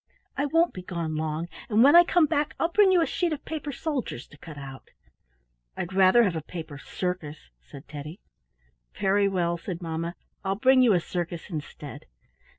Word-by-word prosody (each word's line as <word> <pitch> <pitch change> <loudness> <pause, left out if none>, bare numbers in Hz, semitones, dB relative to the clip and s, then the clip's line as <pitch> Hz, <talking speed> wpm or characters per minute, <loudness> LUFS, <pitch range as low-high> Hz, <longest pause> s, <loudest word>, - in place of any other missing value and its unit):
I 285 - 0
won't 330 +4 +2
be 185 - -7
gone 170 -3 -4
long, 155 +1 -2 0.2
and 220 +1 +5
when 285 +4 +7
I 345 - +10
come 345 -1 +3
back 295 -1 -1
I'll 330 - +1
bring 400 +1 +5
you 355 -2 +4
a - - +1
sheet 350 0 -1
of 295 - -7
paper 310 -2 -4
soldiers 275 - -4
to 145 - -16
cut 155 -2 -10
out." 135 -1 -10 0.9
"I'd 175 +2 -4
rather 190 +5 +6
have 185 -6 +1
a 160 - -2
paper 155 -2 -8
circus," 160 - -5
said 135 - -13
Teddy. 150 +5 -8 0.8
"Very 200 +1 +3
well," 170 -3 0
said 170 0 -5
mamma, 165 0 -4 0.3
"I'll 195 0 0
bring 260 +5 +5
you 240 -4 +5
a 180 - +4
circus 175 +1 -5
instead." 145 -2 -7
180 Hz, 185 wpm, -26 LUFS, 160-265 Hz, 0.9 s, I